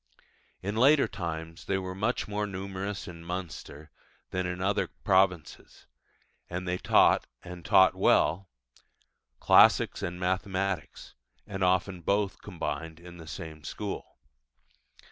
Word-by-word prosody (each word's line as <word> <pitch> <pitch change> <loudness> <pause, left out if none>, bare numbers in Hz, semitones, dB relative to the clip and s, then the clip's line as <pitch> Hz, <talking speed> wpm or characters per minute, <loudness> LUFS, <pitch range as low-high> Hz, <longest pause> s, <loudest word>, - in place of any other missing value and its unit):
In 100 +2 -3
later 140 +5 +5
times 80 -2 -6
they 95 - 0
were 95 -1 -4
much 110 +6 -1
more 105 0 -2
numerous 100 +1 -5
in 85 -2 -9
Munster 85 -4 -7 0.4
than 90 0 -1
in 90 0 -3
the 90 - -3
other 100 +1 +1
provinces; 95 -4 0 0.6
and 90 +1 -4
they 90 0 -1
taught - - +4 0.2
and 90 -1 -9
taught 95 +3 +5
well 90 +3 +2 0.9
classics - - +5
and 90 +1 -4
mathematics; 95 -1 -2 0.3
and 95 -1 -4
often 90 0 +1
both 100 +3 0
combined 80 -4 -5
in 85 0 -12
the 80 -2 -11
same 80 -1 -8
school. 100 +5 -6
95 Hz, 125 wpm, -29 LUFS, 85-100 Hz, 0.9 s, later